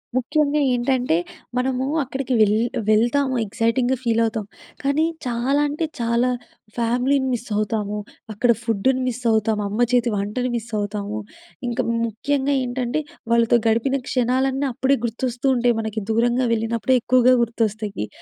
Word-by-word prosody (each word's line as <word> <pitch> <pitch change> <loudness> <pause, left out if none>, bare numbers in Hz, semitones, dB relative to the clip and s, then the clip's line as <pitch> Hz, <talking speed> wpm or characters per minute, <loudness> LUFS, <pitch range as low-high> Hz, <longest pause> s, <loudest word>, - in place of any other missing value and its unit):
ముఖ్యంగా 295 +3 +1
ఏంటంటే 245 -5 +1 0.4
మనము 255 0 0 0.2
అక్కడికి 265 0 -3
వెల్ 210 -1 +5 0.4
వెళ్తాము 250 +5 +2
ఎక్సైటింగ్‍గా 230 +5 0
ఫీల్ 230 -1 +2
అవుతాం. 220 -2 -2 0.4
కానీ 280 +3 +2 0.2
చాలా 250 +4 +1
అంటే 305 +3 -2
చాలా 235 +1 +1 0.5
ఫ్యామిలీని 250 +4 +1
మిస్ 240 0 -4
అవుతాము. 210 -1 -1 0.4
అక్కడ 235 +3 +3
ఫుడ్డుని 240 +3 +1
మిస్ 250 0 -3
అవుతాము. 220 -1 +1
అమ్మ 210 +3 -4
చేతి 245 -1 +3
వంటను 210 +6 -2
మిస్ 235 0 -5
అవుతాము. 205 +1 -3 0.5
ఇంకా 240 - 0 0.3
ముఖ్యంగా 280 +5 -1
ఏంటంటే 250 +3 -2 0.3
వాళ్ళతో 235 0 +4
గడిపిన 230 +5 +2
క్షణాలన్నీ 260 +2 +1
అప్పుడే 265 +3 +2
గుర్తొస్తూ 245 +2 -3
ఉంటాయి. 240 -1 +2
మనకి 220 0 -3
దూరంగా 240 +3 +2
వెళ్ళినప్పుడే 230 +3 +1
ఎక్కువగా 255 0 +5
గుర్తొస్తాయి. 215 - -2
240 Hz, 130 wpm, -22 LUFS, 225-260 Hz, 0.5 s, వెల్